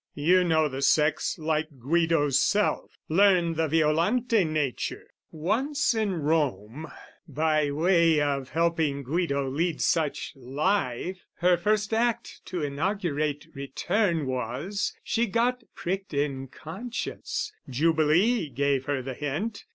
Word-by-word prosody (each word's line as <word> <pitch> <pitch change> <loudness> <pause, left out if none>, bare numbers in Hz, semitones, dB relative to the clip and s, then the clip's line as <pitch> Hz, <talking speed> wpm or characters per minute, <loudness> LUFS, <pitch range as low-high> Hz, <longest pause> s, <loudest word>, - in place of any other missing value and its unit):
You 180 +5 +4
know 160 -3 +2
the 135 -1 -5
sex 150 +3 +2
like 155 -2 -2
Guido's 145 0 +2
self. 205 +9 0
Learn 180 -1 +4
the 160 0 0
Violante 170 - +2
nature! 155 -5 -2 0.3
Once 235 - 0
in 215 -3 0
Rome, 150 - -1 0.4
By 155 -1 +1
way 165 +1 +3
of 140 -3 -1
helping 160 -3 0
Guido 140 -1 -1
lead 155 +4 -1
such 160 -4 0
life, 145 +5 -2
Her 180 +1 +3
first 210 +4 0
act 235 +1 -1
to 180 -4 -4
inaugurate 150 -1 -1
return 165 +5 -1
Was, 130 - -3
she 235 +1 0
got 240 +4 +1
pricked 190 -2 -4
in 140 -2 -1
conscience: 195 - -5 0.2
Jubilee 160 - +2
Gave 140 0 0
her 140 -2 -1
the 130 +1 -5
hint. 155 - -4
160 Hz, 120 wpm, -27 LUFS, 140-185 Hz, 0.4 s, You